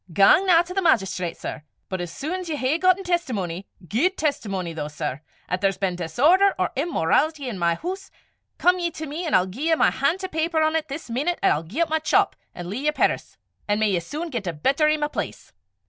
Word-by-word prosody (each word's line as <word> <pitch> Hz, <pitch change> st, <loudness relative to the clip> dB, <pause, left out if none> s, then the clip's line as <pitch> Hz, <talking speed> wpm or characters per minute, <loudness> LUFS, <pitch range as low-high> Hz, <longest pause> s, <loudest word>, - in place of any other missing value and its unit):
Gang 200 Hz, -, +5 dB
na 340 Hz, -2 st, +6 dB
to 360 Hz, +1 st, -8 dB
the 390 Hz, -, 0 dB
magistrate, 195 Hz, -, +1 dB
sir; 160 Hz, -, -6 dB, 0.3 s
but 185 Hz, -1 st, -3 dB
as 175 Hz, -1 st, -5 dB
sune 360 Hz, -, -4 dB
's 345 Hz, -, -8 dB
ye 310 Hz, -, -1 dB
hae 280 Hz, +3 st, 0 dB
gotten 370 Hz, +1 st, +3 dB
testimony 205 Hz, -, -2 dB, 0.2 s
guid 320 Hz, -, +1 dB
testimony 195 Hz, -, -2 dB
though, 150 Hz, -2 st, -4 dB
sir 150 Hz, -2 st, -4 dB, 0.3 s
'at 180 Hz, +1 st, -2 dB
there's 195 Hz, -1 st, +1 dB
been 190 Hz, -2 st, -1 dB
disorder 300 Hz, -, +3 dB
or -, -, 0 dB
immorawlity 290 Hz, -, +1 dB
i' -, -, -2 dB
my 170 Hz, -4 st, 0 dB
hoose, 380 Hz, -, -6 dB, 0.5 s
come 360 Hz, +1 st, +3 dB
ye 345 Hz, -1 st, 0 dB
to 315 Hz, -1 st, -7 dB
me, 310 Hz, +5 st, -5 dB
an' -, -, +2 dB
I'll 185 Hz, -, +4 dB
gie 240 Hz, -, -4 dB
ye 325 Hz, -, +4 dB
my -, -, +3 dB
han' 295 Hz, +6 st, +1 dB
to 380 Hz, -1 st, -4 dB
paper 320 Hz, -1 st, 0 dB
on 310 Hz, 0 st, +2 dB
't 320 Hz, -1 st, -1 dB
this 290 Hz, +3 st, -6 dB
meenute, 285 Hz, +9 st, -1 dB
'at -, -, +5 dB
I'll 150 Hz, -, +1 dB
gie 195 Hz, -, -4 dB
up 335 Hz, -, +2 dB
my 315 Hz, -, +2 dB
chop, 390 Hz, +5 st, +2 dB, 0.2 s
an' 175 Hz, -1 st, -6 dB
lea' 230 Hz, +10 st, -4 dB
yer 300 Hz, -, +4 dB
perris -, -, -1 dB, 0.3 s
an' 205 Hz, 0 st, +1 dB
may 215 Hz, -1 st, +2 dB
ye 180 Hz, -, +2 dB
sune 305 Hz, -, -6 dB
get 230 Hz, -7 st, -4 dB
a 175 Hz, -, -1 dB
better 275 Hz, -, +2 dB
i' 305 Hz, -, +2 dB
my 295 Hz, 0 st, 0 dB
place. 300 Hz, -, -6 dB
290 Hz, 240 wpm, -24 LUFS, -, 0.5 s, na